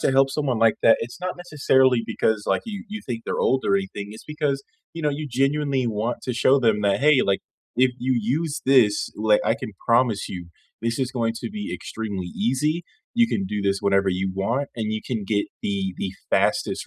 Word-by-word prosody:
to -, -, +2 dB
help 135 Hz, 0 st, +4 dB
someone 135 Hz, -5 st, -1 dB
like 115 Hz, 0 st, +4 dB
that, 115 Hz, -, +7 dB
it's 120 Hz, +9 st, -6 dB
not 180 Hz, 0 st, -3 dB
necessarily 130 Hz, -7 st, +3 dB
because, 110 Hz, -1 st, 0 dB
like, -, -, +1 dB
you 210 Hz, -4 st, -6 dB
you 215 Hz, +1 st, -5 dB
think 115 Hz, -3 st, -4 dB
they're -, -, -2 dB
old 130 Hz, 0 st, +2 dB
or 195 Hz, -, +4 dB
anything, 185 Hz, -, -4 dB
it's 110 Hz, -, -11 dB
because, 150 Hz, -2 st, -1 dB, 0.3 s
you 165 Hz, -, -6 dB
know, 150 Hz, -, +2 dB
you 150 Hz, +2 st, -4 dB
genuinely 135 Hz, 0 st, +1 dB
want 115 Hz, +2 st, -1 dB
to 125 Hz, -, -2 dB
show 130 Hz, +3 st, +4 dB
them 110 Hz, -5 st, +2 dB
that, 100 Hz, +2 st, +2 dB
"Hey, 145 Hz, -1 st, +5 dB
like, 100 Hz, -1 st, +1 dB, 0.4 s
if 130 Hz, +1 st, +4 dB
you 130 Hz, 0 st, +1 dB
use 145 Hz, +7 st, -1 dB
this, 125 Hz, -6 st, +4 dB
like, 105 Hz, 0 st, +3 dB
I -, -, +3 dB
can -, -, -6 dB, 0.2 s
promise 115 Hz, -3 st, +2 dB
you 90 Hz, -2 st, -6 dB, 0.4 s
this 115 Hz, 0 st, -1 dB
is 130 Hz, -2 st, 0 dB
going 115 Hz, -3 st, 0 dB
to -, -, -4 dB
be 210 Hz, 0 st, -5 dB
extremely 100 Hz, -5 st, -5 dB
easy, 140 Hz, -, 0 dB, 0.3 s
you 235 Hz, 0 st, +5 dB
can 195 Hz, -, -1 dB
do 105 Hz, -, -3 dB
this 100 Hz, 0 st, +1 dB
whenever 100 Hz, -1 st, +2 dB
you 95 Hz, +1 st, 0 dB
want, 115 Hz, +9 st, -1 dB
and 110 Hz, -2 st, -2 dB
you 110 Hz, -, -2 dB
can 110 Hz, -5 st, -2 dB
get 105 Hz, 0 st, 0 dB, 0.2 s
the 95 Hz, -2 st, -1 dB
the 95 Hz, -, -3 dB, 0.2 s
fastest -, -, +1 dB
120 Hz, 215 wpm, -24 LUFS, 105-145 Hz, 0.4 s, that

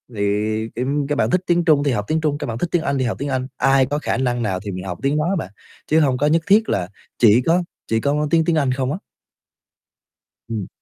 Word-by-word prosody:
thì 105 Hz, +2 st, -1 dB
tim 140 Hz, +3 st, -1 dB
các 145 Hz, -, -1 dB
bạn -, -, +1 dB
thích 185 Hz, 0 st, +2 dB
tiếng 175 Hz, -1 st, +2 dB
Trung 150 Hz, -4 st, +4 dB
thì 145 Hz, -, +1 dB
học 105 Hz, -4 st, -1 dB
tiếng 160 Hz, +1 st, 0 dB
Trung, 150 Hz, -2 st, 0 dB
các 150 Hz, -, -5 dB
bạn 115 Hz, -1 st, -4 dB
thích 175 Hz, -, -1 dB
tiếng 175 Hz, -, +2 dB
Anh 140 Hz, -4 st, -1 dB
thì 130 Hz, -, 0 dB
học 120 Hz, -, -2 dB
tiếng 140 Hz, -, -3 dB
Anh, 130 Hz, -1 st, -2 dB
ai 135 Hz, 0 st, +4 dB
có 145 Hz, +3 st, -2 dB
khả -, -, -1 dB
năng 125 Hz, -2 st, 0 dB
nào 95 Hz, -4 st, -1 dB
thì 100 Hz, +1 st, -6 dB
mình 90 Hz, 0 st, -6 dB
học 90 Hz, -2 st, -5 dB
tiếng 140 Hz, +2 st, +1 dB
đó 150 Hz, -, +1 dB
á 195 Hz, -, +1 dB
bạn, 95 Hz, -, -4 dB, 0.4 s
chứ 160 Hz, +1 st, +3 dB
hông 135 Hz, -4 st, +2 dB
có 145 Hz, -, +1 dB
nhất 165 Hz, +2 st, +3 dB
thiết 215 Hz, +3 st, +4 dB
là 90 Hz, -2 st, -1 dB, 0.3 s
chỉ 115 Hz, +1 st, +6 dB
có 170 Hz, +7 st, +2 dB, 0.2 s
chỉ 110 Hz, 0 st, +1 dB
có 150 Hz, +1 st, 0 dB
tiếng 165 Hz, 0 st, +3 dB
tiếng 170 Hz, -, +2 dB
Anh 140 Hz, -4 st, +2 dB
không 130 Hz, 0 st, -1 dB
á. 155 Hz, -, -2 dB, 1.5 s
Ừm. 110 Hz, -5 st, -3 dB
135 Hz, 265 wpm, -20 LUFS, 115-155 Hz, 1.5 s, chỉ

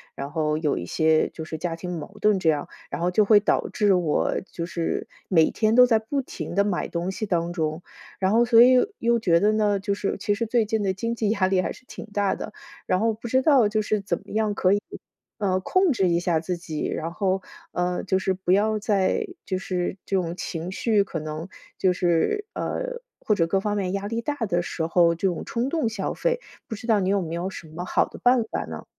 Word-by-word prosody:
然 140 Hz, +1 st, -6 dB
后 155 Hz, -1 st, 0 dB
有 155 Hz, -2 st, 0 dB
一 85 Hz, -, -4 dB
些， 155 Hz, -, +2 dB
就 160 Hz, -, -7 dB
是 155 Hz, 0 st, -6 dB
家 165 Hz, +1 st, -3 dB
庭 175 Hz, 0 st, -5 dB
矛 155 Hz, +7 st, -10 dB
盾 210 Hz, -2 st, +3 dB
这 165 Hz, -, +2 dB
样。 150 Hz, -2 st, 0 dB, 0.2 s
然 -, -, -4 dB
后 175 Hz, +1 st, +1 dB
就 210 Hz, +3 st, +4 dB
会 205 Hz, 0 st, +6 dB
导 -, -, +1 dB
致 205 Hz, -3 st, +2 dB
我， 175 Hz, -5 st, +1 dB
就 170 Hz, -, -5 dB
是 170 Hz, -1 st, -2 dB, 0.2 s
每 165 Hz, -4 st, +4 dB
天 220 Hz, 0 st, +1 dB
都 250 Hz, 0 st, +9 dB
在 230 Hz, -3 st, +3 dB
不 275 Hz, +6 st, -2 dB
停 175 Hz, -, -7 dB
地 200 Hz, -, +4 dB
买 200 Hz, -3 st, -1 dB
东 175 Hz, +2 st, -3 dB
西 215 Hz, -, -4 dB
当 175 Hz, -3 st, -1 dB
中， 160 Hz, -1 st, -2 dB, 0.3 s
然 190 Hz, -1 st, +1 dB
后 235 Hz, +2 st, +4 dB
所 230 Hz, -1 st, +6 dB
以， 255 Hz, +1 st, +6 dB, 0.2 s
又 235 Hz, 0 st, +2 dB
觉 170 Hz, -6 st, +3 dB
得 210 Hz, +1 st, +4 dB
呢， 210 Hz, -2 st, +2 dB
就 200 Hz, +1 st, -1 dB
是 200 Hz, 0 st, -2 dB
其 205 Hz, +1 st, 0 dB
实 230 Hz, +3 st, -2 dB
最 230 Hz, 0 st, +2 dB
近 220 Hz, 0 st, -1 dB
的 190 Hz, -1 st, +1 dB
经 230 Hz, +5 st, -3 dB
济 220 Hz, -3 st, 0 dB
压 200 Hz, -4 st, +2 dB
力 190 Hz, -1 st, +2 dB
还 -, -, -3 dB
是 -, -, -17 dB
挺 -, -, -9 dB
大 200 Hz, -1 st, +1 dB
的， 215 Hz, -, -6 dB, 0.3 s
然 185 Hz, +1 st, +1 dB
后 225 Hz, 0 st, +2 dB
不 225 Hz, +2 st, -8 dB
知 260 Hz, +3 st, +3 dB
道 265 Hz, -6 st, +5 dB
就 215 Hz, +1 st, 0 dB
是 215 Hz, 0 st, 0 dB
怎 200 Hz, +1 st, -2 dB
么 -, -, -20 dB
样 215 Hz, -1 st, 0 dB
可 185 Hz, -2 st, +2 dB
以， 205 Hz, +1 st, +2 dB, 0.6 s
呃， 190 Hz, -4 st, +1 dB
控 370 Hz, -, +2 dB
制 195 Hz, -8 st, +2 dB
一 170 Hz, -1 st, +2 dB
下 175 Hz, -2 st, +1 dB
自 180 Hz, +3 st, -3 dB
己。 165 Hz, -3 st, -4 dB
然 165 Hz, +1 st, -3 dB
后 190 Hz, +1 st, 0 dB, 0.3 s
呃， 180 Hz, 0 st, -1 dB
就 190 Hz, -, +2 dB
是 190 Hz, -, 0 dB
不 185 Hz, -1 st, 0 dB
要 215 Hz, +2 st, +2 dB
在 205 Hz, -, +1 dB, 0.2 s
就 185 Hz, -, -1 dB
是 185 Hz, 0 st, -3 dB
这 195 Hz, -, -1 dB
种 175 Hz, -3 st, 0 dB
情 170 Hz, 0 st, -4 dB
绪， 210 Hz, +1 st, +2 dB
可 175 Hz, -4 st, -5 dB
能 155 Hz, +2 st, -5 dB, 0.3 s
就 185 Hz, -, +3 dB
是 180 Hz, -, +1 dB
呃， -, -, -3 dB, 0.2 s
或 215 Hz, -, +1 dB
者 165 Hz, -4 st, +2 dB
各 195 Hz, +3 st, +1 dB
方 205 Hz, +1 st, -1 dB
面 190 Hz, -2 st, -1 dB
压 200 Hz, 0 st, -2 dB
力 230 Hz, +2 st, -2 dB
大 290 Hz, +4 st, -2 dB
的 175 Hz, -4 st, 0 dB
时 170 Hz, -1 st, -3 dB
候 170 Hz, 0 st, +4 dB
这 180 Hz, +4 st, 0 dB
种 180 Hz, -, -2 dB
冲 235 Hz, +2 st, -1 dB
动 315 Hz, -5 st, 0 dB
消 215 Hz, -3 st, -3 dB
费， -, -, 0 dB, 0.3 s
不 220 Hz, -, -5 dB
知 225 Hz, -, -10 dB
道 220 Hz, -3 st, +4 dB
你 190 Hz, -1 st, 0 dB
有 200 Hz, 0 st, +2 dB
没 165 Hz, -1 st, -5 dB
有 175 Hz, +2 st, -2 dB
什 170 Hz, -, -9 dB
么 160 Hz, +3 st, -6 dB
好 -, -, +2 dB
的 -, -, -12 dB
办 245 Hz, -1 st, +4 dB
法 -, -, -2 dB
呢？ -, -, -8 dB
195 Hz, 265 characters per minute, -24 LUFS, 175-220 Hz, 0.6 s, 都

